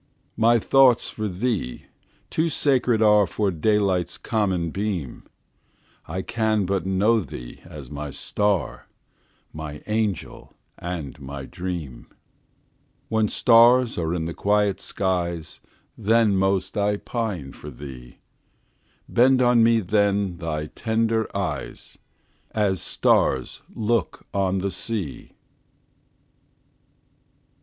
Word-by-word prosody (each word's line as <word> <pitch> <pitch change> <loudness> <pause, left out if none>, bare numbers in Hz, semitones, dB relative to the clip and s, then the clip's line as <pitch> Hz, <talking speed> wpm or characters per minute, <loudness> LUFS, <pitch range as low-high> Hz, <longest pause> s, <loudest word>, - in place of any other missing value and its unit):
My 115 +1 +4
thoughts 130 +1 +4
of 100 -3 -4
thee 110 - -2 0.5
too 165 +1 +1
sacred 125 -6 +2
areFor 105 -2 +3
daylight's 95 -4 +1
common 95 -7 -1
beam:I 95 - -7
can 110 -3 0
but 95 -1 -1
know 105 +5 +3
thee 60 - -8
as 75 -3 -10
my 75 0 -5
star, 100 -2 -1 0.7
My 75 -1 -7
angel 105 -4 -3 0.2
and 85 -6 -5
my 70 0 -7
dream; 85 -6 -6 1.0
When 110 -1 +2
stars 120 +2 +5
are 80 0 -1
in 80 -2 -2
the 85 - -4
quiet 105 0 +1
skies, 85 -4 -2 0.4
Then 110 -1 +3
most 95 +1 0
I 105 0 +1
pine 100 - -4
for 75 - -10
thee; 65 -3 -10 0.9
Bend 130 +2 +4
on 120 -2 +4
me 115 0 +4
then 100 -1 +1
thy 80 -3 -3
tender 110 -1 0
eyes, - - -5 0.6
As 100 -4 +1
stars 65 -2 +1
look 110 -2 -1
on 95 -1 +1
the 100 - 0
sea! 95 -5 -5
100 Hz, 105 wpm, -24 LUFS, 85-110 Hz, 1.0 s, stars